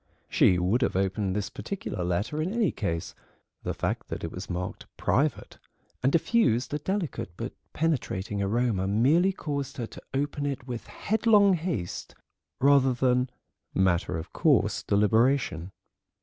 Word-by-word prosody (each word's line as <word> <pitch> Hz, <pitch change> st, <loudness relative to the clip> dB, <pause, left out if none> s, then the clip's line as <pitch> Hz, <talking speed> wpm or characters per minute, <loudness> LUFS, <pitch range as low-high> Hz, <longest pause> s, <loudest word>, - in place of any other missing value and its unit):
She 90 Hz, -, +4 dB
would 95 Hz, +8 st, +1 dB
have 125 Hz, -, +1 dB
opened 95 Hz, 0 st, 0 dB
this 105 Hz, 0 st, -2 dB
particular 145 Hz, -, -4 dB
letter 100 Hz, -, -1 dB
in 170 Hz, +4 st, -1 dB
any 220 Hz, -6 st, +2 dB
case; 85 Hz, -5 st, -3 dB, 0.5 s
the -, -, -3 dB
fact -, -, -2 dB
that -, -, -5 dB
it 85 Hz, -, -3 dB
was 95 Hz, +2 st, -7 dB
marked 90 Hz, 0 st, -4 dB
"private," 140 Hz, 0 st, 0 dB, 0.4 s
and 130 Hz, -, +3 dB
diffused 165 Hz, -, +2 dB
a 150 Hz, -, 0 dB
delicate 165 Hz, -, -2 dB
but -, -, -4 dB, 0.2 s
penetrating 105 Hz, -, -1 dB
aroma 105 Hz, -1 st, +1 dB
merely 140 Hz, -, +4 dB
caused 145 Hz, -7 st, -4 dB
her 120 Hz, -, -2 dB
to -, -, -11 dB
open 145 Hz, +1 st, -1 dB
it 135 Hz, -3 st, -4 dB
with 120 Hz, -3 st, -6 dB
headlong 210 Hz, -2 st, +3 dB
haste 160 Hz, -, -3 dB, 0.4 s
rather 135 Hz, -1 st, +5 dB
than 125 Hz, 0 st, +2 dB, 0.5 s
matter 90 Hz, -2 st, +2 dB
of 80 Hz, -, -8 dB
course -, -, +3 dB
deliberation. 105 Hz, -, +2 dB
125 Hz, 145 wpm, -27 LUFS, 95-150 Hz, 0.5 s, rather